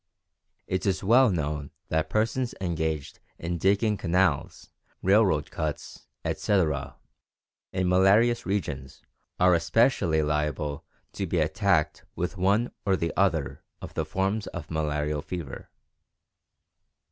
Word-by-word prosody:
It 95 +1 -2
is 95 0 0
well 120 +5 +6
known 75 -5 -2 0.2
that 80 0 0
persons 115 +3 0
engaged 80 -5 -2 0.2
in 85 0 -3
digging 100 +3 +2
canals, 90 -5 0 0.3
railroad 95 -7 +3
cuts, 75 -2 -5 0.2
etc., 75 -9 0 0.8
in 95 -1 0
malarious 100 +6 +4
regions 75 -9 -4 0.4
are 90 0 +5
especially 85 -2 +2
liable 75 -1 -1 0.3
to 95 - -3
be 85 - -1
attacked 80 -2 +1
with 90 +2 -3
one 100 +6 +2
or 95 -2 +2
the 85 -3 -2
other - - 0 0.2
of - - -9
the 80 - -1
forms 95 +7 -1
of 80 -4 -7
malarial 75 -1 -1
fever. 80 -3 -7
90 Hz, 115 wpm, -27 LUFS, 75-100 Hz, 0.8 s, well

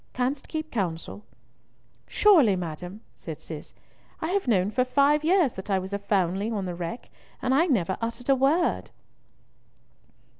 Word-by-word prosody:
Canst 255 +3 -2
keep 315 0 -5
counsel?" 190 -1 -3 0.8
"Surely, 315 - +5
madam," 180 +3 -6
said - - -8
Cis, - - -9 0.5
"I 320 - -2
have 395 -4 0
known 200 -3 +2
for 250 - +2
five 285 +4 +3
years 335 -5 +3
that 190 +2 -8
I 195 - +3
was 190 +1 -5
a 200 - -1
foundling 200 +2 0
on 200 -3 -2
the 180 - -3
wreck, 170 +6 -6 0.3
and 255 - 0
I 325 +6 +4
never 190 - +1
uttered 230 +2 -4
a 275 - +6
word." 285 +7 +1
230 Hz, 155 wpm, -26 LUFS, 190-280 Hz, 0.8 s, a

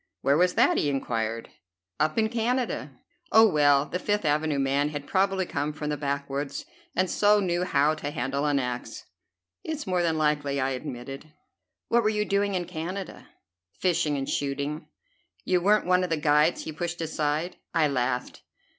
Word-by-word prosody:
"Where 140 - +3
was 180 +3 +3
that?" - - +4
he 145 - +1
inquired. 115 -4 -2 0.5
"Up 155 +1 +1
in 220 -1 +3
Canada." 240 +2 -1 0.4
"Oh, 220 0 +7
well, 145 -5 +4
the 180 - -4
Fifth 205 -2 -1
Avenue 150 0 +1
man 140 +2 +1
had 145 -1 -6
probably 190 +1 +1
come 145 -2 -2
from 150 0 -4
the - - 0
backwoods 140 0 -3 0.3
and 185 +2 +2
so 210 +3 +4
knew 180 -2 0
how 150 -2 +3
to 155 -2 -4
handle 140 +2 -2
an 145 -1 +2
axe." 125 -2 -4 0.6
"It's 315 -2 -4
more 185 -1 +1
than 165 -2 +1
likely," 150 -2 +1
I 135 0 0
admitted. 135 +3 -7 0.6
"What 235 - +4
were 215 - +2
you 210 -1 0
doing 200 -1 +1
in 180 -1 -1
Canada?" 180 +4 -6 0.5
"Fishing 160 -5 +1
and 135 0 -3
shooting." 145 +3 -2 0.6
"You 180 -1 +2
weren't 210 +4 +3
one 180 +1 +3
of 180 - -2
the 165 - +1
guides 150 0 +3
he - - -5
pushed 175 +2 -4
aside?" 155 +1 -2 0.2
I 160 -2 +4
laughed. 125 -2 -2
155 Hz, 170 wpm, -27 LUFS, 140-185 Hz, 0.6 s, Oh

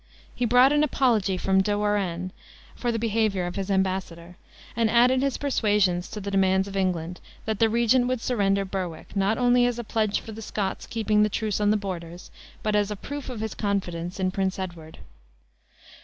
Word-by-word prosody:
He 245 - -1
brought 250 +4 +5
an 295 0 +3
apology 230 -9 +2
from 190 +1 +2
De 205 +1 0
Warenne, 190 -4 -1 0.4
for 240 - -1
the 230 - -1
behavior 215 -4 0
of 175 - -5
his 195 0 -3
embassador; 185 -3 -2 0.4
and 230 -1 +2
added 250 +3 +4
his 275 -2 0
persuasions 205 -9 +1
to 210 - -6
the 200 0 -5
demands 190 0 +2
of 195 - -8
England, 180 -2 -1 0.3
that 220 -2 -2
the 225 - +4
regent 235 +2 +3
would 255 -1 0
surrender 200 -5 +1
Berwick, 185 -3 -5
not 200 +3 +1
only 245 0 +4
as 245 -1 -2
a 240 - -4
pledge 215 -2 0
for 225 - -10
the 220 +1 -8
Scots 205 -2 -3
keeping 215 -2 +1
the 210 - +3
truce 210 -1 -2
on 205 - +3
the 215 - +3
borders, 175 -3 -7 0.3
but 215 -1 0
as 205 -1 +2
a 210 - -3
proof 285 +7 -7
of 240 -4 -6
his 220 -2 -3
confidence 185 -3 -3
in 185 -1 +1
Prince 190 0 -1
Edward. 170 -4 -7
205 Hz, 195 wpm, -25 LUFS, 190-230 Hz, 0.4 s, brought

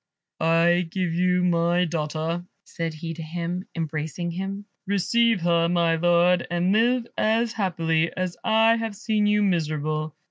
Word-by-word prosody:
"I 165 +2 +3
give 180 -1 -2
you 180 +1 +2
my 175 0 +2
daughter," 160 +1 -3 0.2
said 165 -2 -5
he 165 +1 -6
to 165 - -8
him, 170 +3 -4
embracing 160 +1 -3
him. 195 +3 -5 0.2
"Receive 225 +2 +2
her, 170 0 +2
my 170 -1 +2
Lord, 175 +1 +3
and 175 +2 0
live 235 +3 +2
as 225 +1 +1
happily 165 -5 0
as 185 -1 -2
I 225 +1 +4
have 225 -2 -4
seen 215 0 0
you 210 0 +3
miserable. 155 -4 -1
175 Hz, 145 wpm, -24 LUFS, 165-195 Hz, 0.2 s, I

